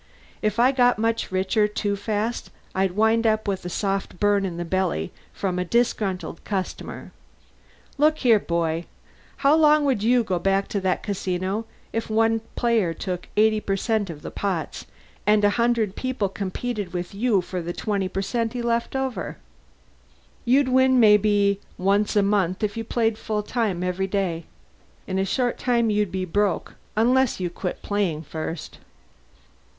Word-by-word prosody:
"If 215 0 0
I 245 +3 +5
got 245 -2 +3
much 230 -1 -1
richer 190 +3 +2
too 210 -1 -2
fast 215 +3 -2 0.2
I'd 190 -1 +1
wind 220 +3 +3
up 215 0 +1
with 195 -2 -1
a - - -3
soft 195 -1 -2
burn 205 -1 +3
in 170 -2 -6
the 175 - -3
belly 180 - -1 0.2
from 185 -2 -2
a - - +1
disgruntled 195 -4 -1
customer. 190 -3 -4 0.9
Look 310 +1 +4
here, 235 -7 +4
boy: 170 -2 -1 0.6
how 280 - +7
long 305 -1 +5
would 260 -7 +1
you 240 +2 +3
go 185 -5 -1
back 195 +2 +1
to 200 - -1
that 185 -1 0
casino 190 +2 -2 0.3
if 225 0 -2
one 225 +1 +2 0.2
player 225 -9 +1
took 180 -2 -4
80% 215 -1 +1
of 150 -3 -8
the - - -6
pots, 185 -6 -3 0.4
and 210 0 +4
a 205 - +4
hundred 235 -3 +1
people 255 -6 -1
competed 200 +1 -4
with 175 +1 -4
you 215 0 +2
for 180 0 -4
the 170 +1 -4
20% 200 +4 -2
he 245 - -3
left 235 +2 -1
over? 265 -2 -3 1.1
You'd 260 +2 +4
win 260 0 +4
maybe 205 -2 +4 0.2
once 200 +3 +1
a 205 - +4
month, 195 -2 +1
if 205 -1 0
you 225 - -3
played 225 -1 0
full 210 -1 -2
time 210 -6 -1
every 180 +1 -1
day. 185 -4 -1 0.6
In 190 - -2
a 190 - +1
short 245 +5 0
time 235 -3 +2
you'd 210 -3 +1
be 185 -1 -2
broke, 200 +1 0 0.2
unless 250 +2 +3
you 180 -2 -2
quit 180 +1 -5
playing 190 -7 -1
first. 160 +1 -6
205 Hz, 160 wpm, -24 LUFS, 185-230 Hz, 1.1 s, how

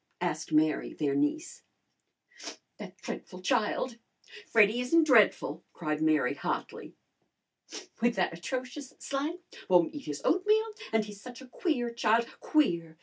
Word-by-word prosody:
asked - - -3
Mary, 155 0 +1
their 145 -3 0
niece. 145 - -1 1.2
"That - - -9
dreadful 185 0 -7
child!" 235 +1 0 0.5
"Freddy 220 +2 +4
isn't 325 +7 +4
dreadful!" 210 - +3
cried 155 -2 -3
Mary 155 -5 +2
hotly. - - -5 1.1
"With 240 0 +2
that 180 -3 0
atrocious 255 - -6
slang! 285 +5 -3 0.3
Won't 175 -2 +4
eat 290 - -8
his 145 -1 -5
oatmeal! 425 +5 +2 0.2
And 220 -1 +2
he's 205 -1 -11
such 245 0 -10
a 265 - -12
queer 250 -5 -1
child 235 0 +2
queer! 170 - +1
230 Hz, 130 wpm, -29 LUFS, 170-270 Hz, 1.2 s, Freddy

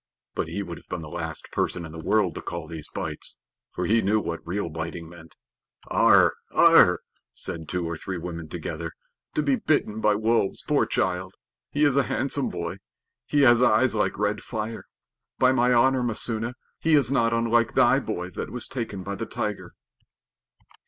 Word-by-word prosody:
But - - -2
he - - -3
would - - -7
have - - -25
been 90 -2 -4
the 75 - -8
last 80 -1 -6
person 85 -2 -1
in 80 - -9
the 80 0 -8
world 105 -5 +2
to - - -6
call 85 -2 -5
these 80 -2 -7
bites, - - -5 0.3
for 90 - -3
he 110 +5 +3
knew 105 +2 +2
what 85 -5 -4
real 90 +2 -2
biting 80 +1 -5
meant. 85 -1 -14 0.6
"Arre! - - +6 0.3
Arre!" - - +7 0.4
said 80 -2 -6
two 90 -1 -1
or 85 - -3
three 95 +3 -5
women 85 -2 -6
together. - - -5 0.4
"To 150 - +1
be 140 -3 +2
bitten 110 -8 0
by 105 -1 +3
wolves, 110 -1 +1
poor - - +2
child! 95 0 -1 0.3
He 150 +1 +2
is 140 -2 +3
a 140 - +5
handsome 135 +3 0
boy. 85 +1 -4 0.5
He 145 - +2
has 120 -3 +6
eyes 125 +1 +4
like 105 - 0
red 105 0 0
fire. 110 -1 -5 0.5
By 130 0 +5
my 125 -1 +3
honor, 130 +2 +4
Messua, 115 0 0 0.2
he 160 -1 +3
is 135 -4 +3
not 115 -4 +3
unlike 115 0 +2
thy - - +5
boy 90 +1 -4
that - - -5
was 125 - -6
taken 110 -7 -5
by 100 +2 -4
the 100 - -5
tiger." - - -4
105 Hz, 185 wpm, -25 LUFS, 85-120 Hz, 0.6 s, Arre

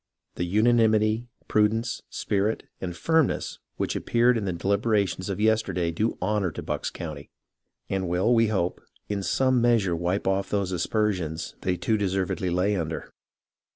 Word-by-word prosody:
The 90 - -2
unanimity, 110 +2 +3 0.2
prudence, 110 +2 +1
spirit, 105 +2 -1 0.2
and 90 -2 -4
firmness 160 -3 +1 0.2
which - - -1
appeared 120 +1 +3
in 110 -3 -1
the 95 - 0
deHberations 100 0 0
of 100 - -3
yesterday 105 -6 +1
do 110 +8 -1
honour 100 0 0
to - - -6
Bucks - - -2
County, 75 -4 -7 0.6
and 95 -2 -2
will, 90 +7 +2
we 115 -1 +4
hope, 95 -5 -1 0.3
in 100 -1 -1
some 130 +4 +2
measure 115 -7 +3
wipe 90 +4 -1
off 95 0 0
those 100 -2 0
aspersions 90 -3 -1
they 90 -1 0
too 110 +4 +1
deservedly 95 -2 -1
lay 90 +4 +1
under. 80 -3 -4
100 Hz, 150 wpm, -26 LUFS, 90-110 Hz, 0.6 s, we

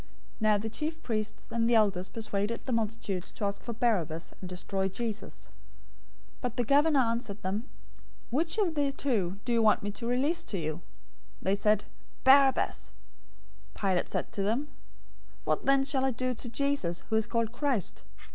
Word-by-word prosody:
027:020 - - -25
Now 215 -1 +4
the 220 +2 -3
chief 315 +5 -3
priests 215 -2 -3
and 230 0 +1
the 235 - +4
elders 195 -4 +3
persuaded 220 0 -3
the 260 - -3
multitudes 215 -5 -1
to 205 - -3
ask 200 0 -2
for 235 - -5
Barabbas, 175 -9 0
and 185 - -6
destroy 190 +1 -2
Jesus. 195 - -5 0.9
027:021 - - -31
But 245 -1 -3
the 245 - +2
governor 290 +4 +4
answered 230 -3 -2
them, 200 +5 -2 0.7
"Which 325 - +1
of 390 -6 +2
the 285 -2 +1
two 205 -10 0
do 245 - 0
you 230 - +4
want 215 -2 +4
me 205 - -2
to 230 +3 -5
release 280 +8 +1
to 200 - -3
you?" 155 0 -3 0.6
They 190 - +1
said, 210 0 +3 0.4
"Barabbas!" 270 0 +5 0.8
027:022 - - -12
Pilate 190 -3 +2
said - - -2
to 200 - -2
them, 235 +9 0 0.7
"What - - -1
then 275 0 +5
shall 270 -1 +1
I 265 - +3
do 255 +1 -1
to 240 0 -6
Jesus, 275 -10 0
who - - +3
is 220 -1 +2
called 230 -2 0
Christ?" 245 - -1
230 Hz, 180 wpm, -30 LUFS, 200-265 Hz, 0.9 s, Barabbas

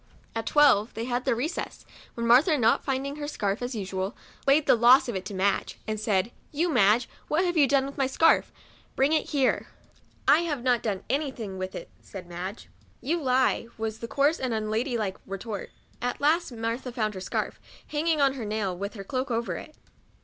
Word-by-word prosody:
At 225 0 -4
twelve 275 -8 +4
they 225 +1 -3
had 245 0 -2
their - - +2
recess, 300 +9 -4 0.3
when 235 - -2
Martha, 275 +7 +5
not 230 -3 +3
finding 275 +1 -2
her 295 -1 -4
scarf 205 -6 -2
as 245 0 -3
usual, 190 -1 -3 0.3
laid 285 +2 +5
the - - +6
loss 240 +4 +6
of 240 - -3
it 190 0 -4
to 195 - -6
Madge, 195 +2 0
and 215 -1 -2
said, 210 0 0
" - - -35
You, 330 +4 0
Madge, 220 +1 +4 0.2
what 330 +5 +1
have 350 -1 0
you 290 -4 +5
done 270 0 +3
with 275 +1 -8
my 270 - +3
scarf? 325 +5 +3 0.4
bring 275 +4 +3
it 315 - +1
here." 275 -4 +1 0.3
" - - -33
I 310 - +7
have 300 -7 -2
not 245 -2 +2
clone 200 -4 -2
any 285 +1 0
thing 210 -7 -7
with 185 0 -4
it," - - -8
said 190 -3 -9
Madge. 180 +4 -7 0.2
" - - -33
You 340 +1 +1
lie," 255 -3 +2
was 220 0 -3
the 230 - -5
coarse 285 +6 +2
and 250 -3 -1
unladylike 220 -1 -1
retort. 195 +2 -5 0.3
At 245 0 -2
last 310 +2 +2
Martha 230 +2 -3
found 215 -3 -1
her 190 - -7
scarf, - - -3 0.3
hanging 310 +1 0
on 275 -1 +4
her 260 -4 -6
nail, 210 -3 -2
with 200 +5 -5
her 200 - -6
cloak 255 +6 -3
over 230 0 -1
it. 310 - -9
240 Hz, 210 wpm, -27 LUFS, 210-280 Hz, 0.4 s, I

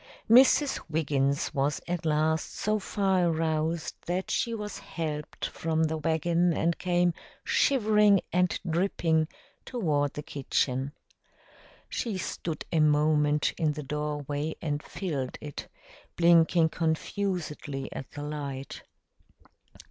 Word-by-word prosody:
Mrs. 265 +4 +6
Wiggins 145 -2 0
was 145 +1 0
at 175 -2 -2
last 155 +1 +1
so 215 0 0
far 190 -3 +1
aroused 160 0 0
that 180 +2 -2
she 235 - 0
was 210 -2 -5
helped 150 -3 -5
from 160 0 -1
the 160 0 0
wagon 165 +2 +1
and 170 +1 +1
came 175 -1 +2 0.3
shivering 210 -6 +4
and 180 0 +2
dripping 165 -2 +1 0.4
toward 150 - 0
the 150 - -5
kitchen. 135 -1 -1 0.9
She 220 -5 -3
stood 165 -3 -4
a 165 - +2
moment 150 0 +3
in 155 -3 +2
the 150 0 -6
doorway 150 +1 -3
and 145 -2 -2
filled 145 -10 -4
it, 150 -2 -7 0.5
blinking 170 -1 +5
confusedly 160 -4 -2
at 135 - -7
the 145 - -7
light. 140 -2 -5
160 Hz, 115 wpm, -28 LUFS, 150-175 Hz, 0.9 s, Mrs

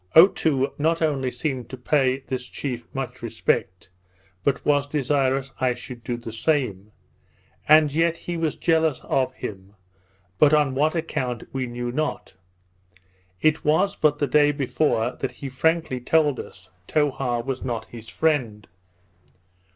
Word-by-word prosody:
Otoo 160 -5 +5
not 165 +3 +2
only 135 -4 0
seemed 130 -3 -4
to 130 - -7
pay 130 0 +1
this 130 -1 -5
chief 125 -4 -5
much 135 -2 -5
respect, 90 -1 -1 0.6
but 140 - 0
was 145 -1 +2
desirous 135 -2 0
I 130 -2 +1
should 120 -1 -10
do 120 0 -3
the 115 -2 -8
same; 115 -7 -1 0.8
and 155 -1 +6
yet 165 +2 +1
he 175 +1 -5
was 165 -2 -1
jealous 160 -4 +1
of 130 -1 0
him, 100 -3 -8 0.6
but 150 0 +6
on 145 -3 +2
what 150 +5 +1
account 125 -7 -2
we 130 -1 -2
knew 120 0 -4
not. 155 +4 -3 1.1
It 155 0 +3
was 160 +7 +2
but 150 -1 +2
the 145 - +1
day 145 +2 +4
before 135 -4 0
that 135 - -3
he 140 - -7
frankly 160 0 0
told 150 +1 +2
us, 95 -1 -10 0.2
Towha 130 -5 0
was 135 -1 -3
not 120 -3 -3
his 115 -2 -11
friend. 125 -10 0
135 Hz, 145 wpm, -24 LUFS, 125-155 Hz, 1.1 s, and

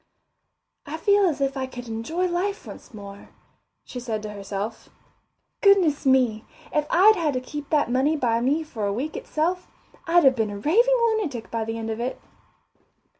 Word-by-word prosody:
I 305 +2 -4
feel 405 +4 +3
as 300 -5 -2
if 275 0 0
I 260 -1 -3
could 245 -1 -9
enjoy 230 +11 -2
life 365 +3 -2
once - - -11
more, 200 -2 -11 0.6
she 250 - -7
said 225 -3 -4
to 210 - -5
herself. 200 +2 -6 0.7
Goodness 365 -9 +4
me, 250 -5 +3 0.3
if 300 0 +1
I'd 415 +5 +6
had 315 -7 -1
to - - +1
keep 290 +3 -8
that 295 -6 +1
money 275 +5 +2
by 235 -4 +1
me 285 +6 +1
for 225 -10 -4
a 200 - -1
week 275 +9 -4
itself, 350 +4 -2 0.4
I'd 345 +1 +5
have 265 -2 +5
been 220 -3 0
a 205 - -6
raving 465 - +3
lunatic 310 - -3
by 230 -1 -2
the 225 +1 -4
end 225 0 -4
of 220 - -4
it. 245 +2 -3
265 Hz, 180 wpm, -24 LUFS, 225-325 Hz, 0.7 s, I'd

